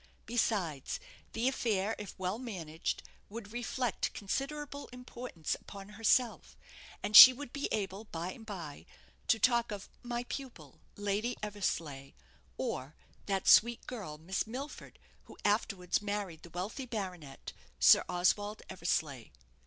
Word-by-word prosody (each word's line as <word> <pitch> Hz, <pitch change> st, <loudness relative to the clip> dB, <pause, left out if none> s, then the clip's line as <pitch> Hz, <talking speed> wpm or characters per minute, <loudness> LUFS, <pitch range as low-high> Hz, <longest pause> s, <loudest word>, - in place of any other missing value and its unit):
Besides, 195 Hz, -, -1 dB, 0.3 s
the 230 Hz, +3 st, 0 dB
affair, 220 Hz, -5 st, 0 dB
if 205 Hz, -, -8 dB
well 190 Hz, +3 st, -2 dB
managed, 170 Hz, -10 st, -4 dB, 0.3 s
would 215 Hz, 0 st, -8 dB
reflect 240 Hz, -1 st, -1 dB
considerable 285 Hz, +7 st, -4 dB
importance 250 Hz, -9 st, -5 dB
upon 200 Hz, 0 st, -9 dB
herself, 225 Hz, +3 st, +1 dB, 0.5 s
and 215 Hz, -, -1 dB
she 255 Hz, -, +15 dB
would 255 Hz, 0 st, -8 dB
be 280 Hz, -, -1 dB
able 200 Hz, 0 st, -2 dB
by 170 Hz, -2 st, -4 dB
and 225 Hz, -, -11 dB
bye 170 Hz, -, -8 dB, 0.4 s
to -, -, +4 dB
talk 235 Hz, +1 st, +3 dB
of 200 Hz, -1 st, -6 dB
"my 240 Hz, -1 st, -3 dB
pupil, 245 Hz, -, -8 dB, 0.2 s
Lady 205 Hz, +4 st, -1 dB
Eversleigh;" 165 Hz, -9 st, -3 dB, 0.4 s
or, 135 Hz, +4 st, -3 dB, 0.3 s
"that 195 Hz, -2 st, -1 dB
sweet 235 Hz, +2 st, +6 dB
girl, 200 Hz, -12 st, -6 dB
Miss 185 Hz, +7 st, -2 dB
Milford, 265 Hz, +6 st, -7 dB, 0.3 s
who -, -, -14 dB
afterwards 200 Hz, -4 st, +1 dB
married 200 Hz, -5 st, -3 dB
the 170 Hz, -, -12 dB
wealthy 195 Hz, -, -5 dB
baronet, 180 Hz, -, -6 dB, 0.3 s
Sir 60 Hz, -, +8 dB
Oswald 205 Hz, +4 st, +1 dB
Eversleigh." 155 Hz, -8 st, -2 dB
205 Hz, 130 wpm, -33 LUFS, 180-240 Hz, 0.5 s, she